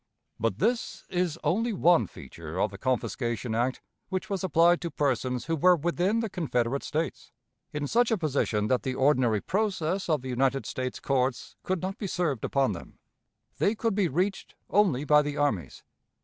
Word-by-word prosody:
But 110 Hz, -3 st, 0 dB
this 230 Hz, -, -1 dB
is 175 Hz, -3 st, 0 dB
only 225 Hz, +5 st, +1 dB
one 170 Hz, -, +4 dB
feature -, -, -8 dB
of -, -, +1 dB
the -, -, -10 dB
confiscation 120 Hz, -2 st, -1 dB
act 120 Hz, +3 st, -1 dB, 0.3 s
which 190 Hz, +2 st, -3 dB
was 195 Hz, -1 st, -1 dB
applied 170 Hz, 0 st, +4 dB
to 170 Hz, -, -3 dB
persons 130 Hz, -4 st, -1 dB
who 165 Hz, -, 0 dB
were 180 Hz, +4 st, +5 dB
within 175 Hz, +7 st, 0 dB
the 225 Hz, -, -1 dB
Confederate 140 Hz, -, -1 dB
States, 160 Hz, +2 st, -3 dB, 0.4 s
in 150 Hz, -1 st, -3 dB
such 235 Hz, +9 st, +2 dB
a 225 Hz, -, +2 dB
position 140 Hz, -, 0 dB
that 125 Hz, +3 st, +1 dB
the 130 Hz, -2 st, -3 dB
ordinary 130 Hz, -6 st, +3 dB
process 190 Hz, -2 st, -1 dB
of 150 Hz, -5 st, +1 dB
the 130 Hz, -, -5 dB
United 135 Hz, +2 st, +1 dB
States 130 Hz, -1 st, -4 dB
courts 130 Hz, -2 st, -1 dB
could 185 Hz, -1 st, -2 dB
not 190 Hz, +4 st, -3 dB
be 205 Hz, -, -3 dB
served 165 Hz, -, -1 dB
upon 135 Hz, -4 st, +1 dB
them. 85 Hz, -, -9 dB, 0.6 s
They 210 Hz, -, +2 dB
could 225 Hz, 0 st, 0 dB
be 195 Hz, -2 st, +2 dB
reached 185 Hz, +7 st, -2 dB, 0.2 s
only 180 Hz, -10 st, +3 dB
by 150 Hz, 0 st, +6 dB
the 145 Hz, 0 st, -4 dB
armies. 100 Hz, -, -1 dB
150 Hz, 175 wpm, -28 LUFS, 130-185 Hz, 0.6 s, by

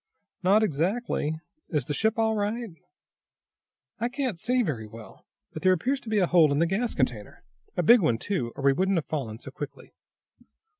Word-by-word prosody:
"Not 200 Hz, +4 st, +4 dB
exactly. 165 Hz, -, -1 dB, 0.3 s
Is 150 Hz, -7 st, -1 dB
the 145 Hz, -, -3 dB
ship 220 Hz, +7 st, +1 dB
all 220 Hz, -1 st, +2 dB
right?" 215 Hz, +2 st, -2 dB, 1.3 s
"I 235 Hz, +2 st, 0 dB
can't 245 Hz, -, -3 dB
see 250 Hz, +4 st, +1 dB
very 120 Hz, -, -3 dB
well, 110 Hz, -2 st, -13 dB, 0.3 s
but 155 Hz, -, -6 dB
there 185 Hz, +2 st, +5 dB
appears 260 Hz, +11 st, 0 dB
to 235 Hz, -, -10 dB
be 215 Hz, -, +1 dB
a 190 Hz, -, +4 dB
hole 170 Hz, -4 st, +5 dB
in 140 Hz, -, +1 dB
the 165 Hz, -, +3 dB
gas 210 Hz, +7 st, -1 dB
container. -, -, -2 dB, 0.3 s
A -, -, +2 dB
big 235 Hz, -1 st, +7 dB
one, 120 Hz, -9 st, +2 dB
too, 125 Hz, -, -2 dB
or 140 Hz, -, -7 dB
we 140 Hz, 0 st, +5 dB
wouldn't 190 Hz, +5 st, +1 dB
have 160 Hz, -, -1 dB
fallen 125 Hz, -8 st, -4 dB
so 135 Hz, -, -9 dB
quickly." 140 Hz, +1 st, -8 dB
180 Hz, 190 wpm, -27 LUFS, 145-220 Hz, 1.3 s, big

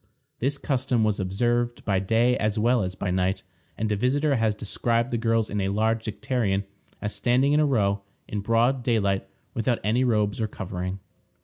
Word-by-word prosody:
This 140 Hz, +3 st, 0 dB
custom 130 Hz, -4 st, 0 dB
was 105 Hz, -1 st, +1 dB
observed 120 Hz, +5 st, 0 dB
by 95 Hz, -3 st, +2 dB
day 115 Hz, +6 st, +2 dB
as 105 Hz, -2 st, 0 dB
well 120 Hz, +2 st, +3 dB
as 90 Hz, -1 st, -3 dB
by 95 Hz, -, -2 dB
night, 95 Hz, +1 st, 0 dB, 0.3 s
and 110 Hz, 0 st, -1 dB
a -, -, +2 dB
visitor 140 Hz, +6 st, +1 dB
has 110 Hz, -2 st, +1 dB
described 115 Hz, +3 st, -1 dB
the 120 Hz, -, +1 dB
girls 115 Hz, -1 st, +1 dB
in 105 Hz, 0 st, -2 dB
a 95 Hz, -, 0 dB
large 110 Hz, +3 st, +1 dB
dicterion 105 Hz, -2 st, -1 dB, 0.4 s
as 105 Hz, 0 st, -2 dB
standing 130 Hz, +4 st, +2 dB
in 150 Hz, -, +4 dB
a 150 Hz, -, +4 dB
row, 100 Hz, -6 st, +1 dB, 0.3 s
in 105 Hz, -, -3 dB
broad 115 Hz, +5 st, +2 dB
daylight, 100 Hz, -5 st, +1 dB, 0.3 s
without 115 Hz, +1 st, 0 dB
any 115 Hz, +5 st, +2 dB
robes 105 Hz, -3 st, +1 dB
or 110 Hz, -, +1 dB
covering. 95 Hz, -2 st, -5 dB
110 Hz, 185 wpm, -25 LUFS, 100-120 Hz, 0.4 s, in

